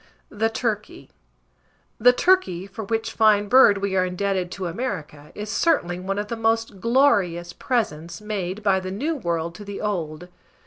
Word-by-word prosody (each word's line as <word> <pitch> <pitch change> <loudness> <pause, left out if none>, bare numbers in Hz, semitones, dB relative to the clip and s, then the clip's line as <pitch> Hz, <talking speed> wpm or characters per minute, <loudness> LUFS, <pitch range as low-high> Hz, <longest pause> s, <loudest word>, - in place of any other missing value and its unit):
THE 220 +2 0
TURKEY. 220 -2 -4 0.9
The 245 +3 +7
turkey, 245 - +2
for 200 +3 -8
which 225 +2 -2
fine 210 -2 +4
bird 230 -3 +6
we 195 -1 -2
are 185 - +3
indebted 185 0 -1
to 190 - -5
America, 165 - -5
is 210 0 -5
certainly 180 - +1
one 195 +2 -3
of 205 0 -2
the 235 - -3
most 225 -2 0
glorious 200 -9 +2
presents 170 - -2
made 210 -2 -4
by 195 -2 +3
the 185 0 -6
New 265 +13 -2
World 170 - -2
to 205 - -10
the 200 0 -7
Old. 175 -5 -3
200 Hz, 165 wpm, -23 LUFS, 180-225 Hz, 0.9 s, The